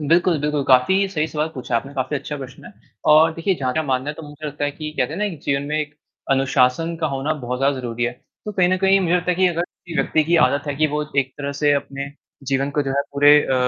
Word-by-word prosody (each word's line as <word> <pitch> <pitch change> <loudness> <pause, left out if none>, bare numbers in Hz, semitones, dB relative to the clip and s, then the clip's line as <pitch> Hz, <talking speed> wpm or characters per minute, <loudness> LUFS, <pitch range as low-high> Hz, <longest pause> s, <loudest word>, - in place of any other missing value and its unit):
बिल्कुल, 170 +2 +3
बिल्कुल, 150 0 0
काफ़ी 140 +10 +4
सही 155 -5 -1
सवाल 155 +1 -2
पूछा 125 -2 -4
आपने, 135 +4 -4
काफ़ी 135 +2 -1
अच्छा 150 +2 -5
प्रश्न 135 -1 -10
है। - - -11 0.4
और 160 +2 +6
देखिए, 170 +4 0
जहाँ 130 -1 0
तक 160 - +1
मानना 130 +2 0
है - - -8
तो 160 - -10
मुझे 150 0 -9
लगता 145 0 -3
है 145 - 0
कि 155 +1 -6
कहते 125 - 0
हैं - - -5
ना, 210 - 0
एक 180 -7 -4
जीवन 140 0 0
में 150 +1 0
एक 150 -1 -5 0.4
अनुशासन 135 +4 +2
का 160 - +1
होना 135 +3 -1
बहुत 125 +1 -3
ज़्यादा 135 0 +1
ज़रूरी 120 -1 -3
है। 120 - -1 0.3
तो 210 - -4
कहीं 185 -3 +3
न 185 - +2
कहीं 195 +1 +4
मुझे 175 -2 +1
लगता 180 0 +1
है - - +2
कि 185 0 +4
अगर 170 -1 -1
किसी 175 -1 -9
व्यक्ति 155 -1 +1
की 170 +2 +2
आदत 140 +3 -2
है 145 - -2
कि 155 +2 +3
वो 150 0 -2 0.2
एक 130 -1 +1
तरह 140 0 -3
से 145 -1 +4
अपने 140 0 -3 0.4
जीवन 135 +1 +1
को 145 +1 0
जो 135 - -3
है - - +3
पूरे 145 +1 +5
अ, 130 - 0
145 Hz, 270 wpm, -21 LUFS, 135-165 Hz, 0.4 s, और